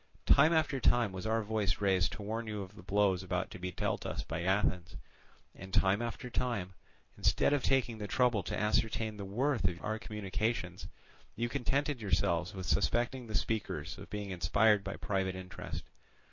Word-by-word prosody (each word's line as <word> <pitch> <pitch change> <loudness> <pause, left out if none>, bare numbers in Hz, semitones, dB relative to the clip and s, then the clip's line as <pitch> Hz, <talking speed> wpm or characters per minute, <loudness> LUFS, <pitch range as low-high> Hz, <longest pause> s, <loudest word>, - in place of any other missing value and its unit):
Time 155 +4 +6
after 155 -4 +2
time 120 -4 +3
was 95 +2 -5
our 110 0 +1
voice 105 -2 0
raised 95 -3 +2
to 105 - -7
warn 110 +2 -3
you 105 -2 -3
of 95 - -12
the - - -11
blows 95 0 +2
about 95 0 -2
to - - -8
be 90 0 -3
dealt - - -2
us - - -3
by 80 +1 -4
Athens, 95 -1 +1 0.6
and 95 +1 -10
time 95 +3 +3
after 120 +1 -4
time, 115 -7 -2 0.5
instead - - +3
of 145 - +2
taking 125 -5 +1
the 105 - -4
trouble 125 -2 +2
to - - -3
ascertain 110 0 0
the 100 - -5
worth 120 +1 +1
of 90 -1 -3
our 110 +1 -1
communications, 105 -3 -3 0.5
you 120 +1 0
contented 140 +1 -1
yourselves 90 -2 +1
with 95 -1 -5
suspecting 120 +4 +1
the 110 - -6
speakers 100 -8 -1
of 100 - -10
being 105 -2 -4
inspired 100 +3 +3
by 100 - -4
private 95 -2 -1
interest. 95 0 -6
105 Hz, 180 wpm, -33 LUFS, 95-115 Hz, 0.6 s, Time